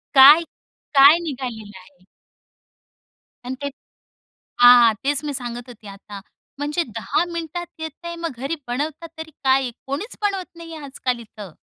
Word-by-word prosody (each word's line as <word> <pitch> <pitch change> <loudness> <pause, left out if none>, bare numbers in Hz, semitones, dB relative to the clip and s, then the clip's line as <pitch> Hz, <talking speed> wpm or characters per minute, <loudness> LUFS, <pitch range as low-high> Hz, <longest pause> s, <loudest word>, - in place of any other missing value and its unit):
काय-काय 290 0 +6
निघालेलं 245 - -6
आहे. 185 0 -21 1.4
आणि 255 +1 -4
ते 285 - -1 0.9
हां. 245 -2 +8
तेच 285 +1 0
मी 290 -1 -3
सांगत 245 -1 -6
होते 225 -3 -12
आता, 200 0 -10 0.4
म्हणजे 295 +4 -1
10 225 - 0
मिनिटात 335 +1 -5
येतंय 330 +2 -7
मग - - -3
घरी 275 +6 -3
बनवतात 295 +7 -4
तरी 320 0 -7
काय? 265 -1 +3 0.2
कोणीच 290 - -4
बनवत 390 -4 -2
नाहीये 330 -3 -9
आजकाल 260 -3 -3
इथं. 210 -5 -11
275 Hz, 130 wpm, -22 LUFS, 240-320 Hz, 1.4 s, हां